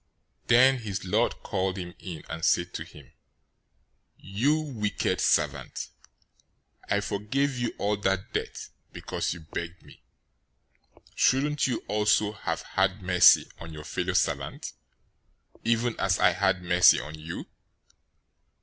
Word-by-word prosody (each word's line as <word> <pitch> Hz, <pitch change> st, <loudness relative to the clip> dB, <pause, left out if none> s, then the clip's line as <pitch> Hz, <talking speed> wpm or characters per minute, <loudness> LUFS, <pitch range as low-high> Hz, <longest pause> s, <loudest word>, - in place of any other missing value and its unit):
018:032 -, -, -36 dB
Then 130 Hz, +3 st, +6 dB
his 100 Hz, -4 st, -5 dB
lord 110 Hz, +6 st, 0 dB
called 95 Hz, -2 st, -2 dB
him 90 Hz, -2 st, -6 dB
in, 85 Hz, -5 st, -8 dB
and 80 Hz, -, -6 dB
said 85 Hz, -1 st, +2 dB
to -, -, -4 dB
him, -, -, -16 dB, 1.1 s
'You 130 Hz, +11 st, 0 dB
wicked 120 Hz, -9 st, -2 dB
servant! -, -, 0 dB, 1.0 s
I 100 Hz, -, +2 dB
forgave 110 Hz, +8 st, -1 dB
you 120 Hz, -1 st, -3 dB
all 105 Hz, +1 st, 0 dB
that 95 Hz, -1 st, -1 dB
debt, -, -, -4 dB, 0.2 s
because -, -, -3 dB
you 85 Hz, -, -11 dB
begged 85 Hz, +2 st, -7 dB
me. -, -, -17 dB, 1.1 s
018:033 -, -, -31 dB
Shouldn't 145 Hz, +2 st, +2 dB
you 125 Hz, -3 st, -2 dB
also 105 Hz, 0 st, +2 dB
have 100 Hz, -, -4 dB
had 95 Hz, +1 st, 0 dB
mercy 90 Hz, -1 st, +6 dB
on 85 Hz, 0 st, -9 dB
your 75 Hz, -1 st, -8 dB
fellow -, -, -2 dB
servant, -, -, -1 dB, 0.9 s
even 115 Hz, +1 st, +1 dB
as 95 Hz, 0 st, +2 dB
I 90 Hz, -, +4 dB
had 95 Hz, 0 st, 0 dB
mercy 90 Hz, 0 st, +5 dB
on 75 Hz, +5 st, -8 dB
you?' 80 Hz, +2 st, -7 dB
100 Hz, 135 wpm, -27 LUFS, 90-115 Hz, 1.1 s, Then